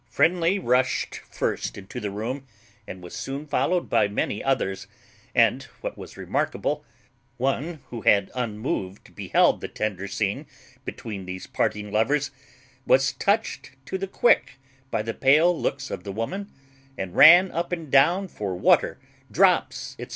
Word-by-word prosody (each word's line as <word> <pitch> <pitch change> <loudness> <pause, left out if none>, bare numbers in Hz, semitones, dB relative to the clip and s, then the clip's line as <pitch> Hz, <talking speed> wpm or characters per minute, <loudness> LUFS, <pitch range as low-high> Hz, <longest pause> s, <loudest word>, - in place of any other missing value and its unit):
Friendly 175 +6 +2
rushed 125 -7 0
first - - -3
into 95 0 -8
the 105 - -3
room, 120 +7 -5 0.4
and 90 -1 -9
was 90 - -9
soon 140 +2 -5
followed 175 +4 0
by - - +3
many 100 0 -2
others, 95 -8 -1 0.5
and, - - +4 0.2
what - - -4
was - - -11
remarkable, - - -2 0.5
one 140 +5 -2
who 120 -2 -5
had 100 -2 +3
unmoved 105 -5 -4
beheld - - +2
the - - -4
tender 100 -2 -3
scene 100 0 -2 0.4
between 100 -4 -7
these 90 0 -6
parting 105 -1 -2
lovers 140 +7 +1 0.6
was 135 +1 +4
touched 205 -7 -1
to 190 - -4
the 195 - -3
quick 195 - +3 0.4
by 105 - -1
the 115 +1 -3
pale 155 +8 +4
looks 135 -4 -3
of - - -5
the 100 - -5
woman, 185 - -4 0.5
and 95 -2 -5
ran 175 +4 +8
up 170 +2 -3
and 165 -5 -4
down 170 +8 +4
for 100 - -4
water, 90 - +3 0.3
drops, - - +2
&c. - - -6
130 Hz, 150 wpm, -25 LUFS, 105-165 Hz, 0.6 s, ran